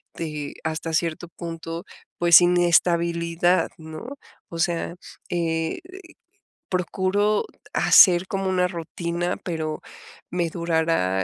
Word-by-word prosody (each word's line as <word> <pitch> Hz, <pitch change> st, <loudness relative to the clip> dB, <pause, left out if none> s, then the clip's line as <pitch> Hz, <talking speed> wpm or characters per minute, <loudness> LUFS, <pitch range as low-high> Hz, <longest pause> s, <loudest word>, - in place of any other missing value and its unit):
de 150 Hz, -3 st, -5 dB
hasta 160 Hz, +1 st, -3 dB
cierto 165 Hz, +1 st, -1 dB
punto, 165 Hz, 0 st, -7 dB, 0.3 s
pues, 170 Hz, 0 st, +7 dB
inestabilidad, 170 Hz, 0 st, +2 dB
¿no?, 160 Hz, -, -9 dB, 0.3 s
o 170 Hz, -, -7 dB
sea, 170 Hz, 0 st, -1 dB, 0.3 s
eh, 165 Hz, -2 st, -1 dB, 0.9 s
procuro 190 Hz, -, 0 dB, 0.3 s
hacer 180 Hz, -1 st, +6 dB
como 195 Hz, -2 st, -2 dB
una 180 Hz, -1 st, +2 dB
rutina, 170 Hz, +1 st, -3 dB
pero, 155 Hz, -3 st, -4 dB, 0.5 s
me 175 Hz, -1 st, -1 dB
durará, 160 Hz, -, 0 dB
170 Hz, 95 wpm, -24 LUFS, 165-175 Hz, 0.9 s, pues